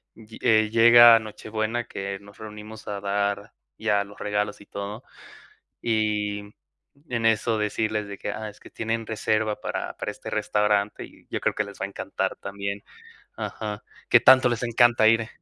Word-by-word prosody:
lle 110 0 -13
eh, 110 -1 +4
llega 115 +1 +8
Nochebuena, 110 +2 -4
que 100 0 -5
nos 100 +1 -16
reunimos 105 0 -10
a 100 -1 -4
dar 100 +1 -1 0.2
ya 105 -2 +1
los 100 - -15
regalos 105 0 -2
y 100 - -14
todo, 100 +4 -7 0.8
y 105 -2 0 0.7
en 120 -2 -2
eso 110 +1 +2
decirles 105 0 -1
de 100 -1 -8
que: - - -4
"Ah, 110 +1 -5
es 105 - -19
que - - -14
tienen 115 0 -3
reserva 110 -1 -1
para - - -4
para - - -4
este - - -9
restaurante". 105 0 0
Y - - -16
yo - - -2
creo - - 0
que 105 - -1
les 100 -1 -12
va - - -1
a - - -9
encantar 100 - -3
también. 100 0 -5 0.6
Ajá, 105 -2 -5 0.3
que - - +7
tanto 130 -1 +7
les 120 -1 -2
encanta 120 -1 +4
ir. 115 0 +3
105 Hz, 170 wpm, -25 LUFS, 105-115 Hz, 0.8 s, llega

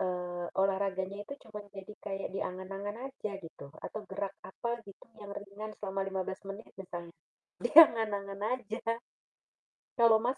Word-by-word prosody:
eee, 180 -1 -1 0.2
olahraganya 195 0 +1
itu 280 - -5
cuman 210 -1 -7
jadi 195 +2 -7
kayak 195 -1 -2
di - - 0
angan-angan 195 +3 -4
aja 265 -6 -4
gitu, 160 -3 -9 0.2
atau 215 - -3
gerak 195 0 -1
apa 235 +5 -4 0.2
gitu 195 - -12 0.2
yang 205 -1 -7
ringan 205 +2 -6
selama 195 -1 -2
15 190 0 -2
menit 200 +3 -6
misalnya, 175 -2 -6 0.5
di 240 - 0
angan-angan 210 -9 +8 0.2
aja. 225 -3 -5 1.2
Kalau 230 -2 +8
Mas, 250 +3 +1
200 Hz, 145 wpm, -33 LUFS, 190-215 Hz, 1.2 s, angan-angan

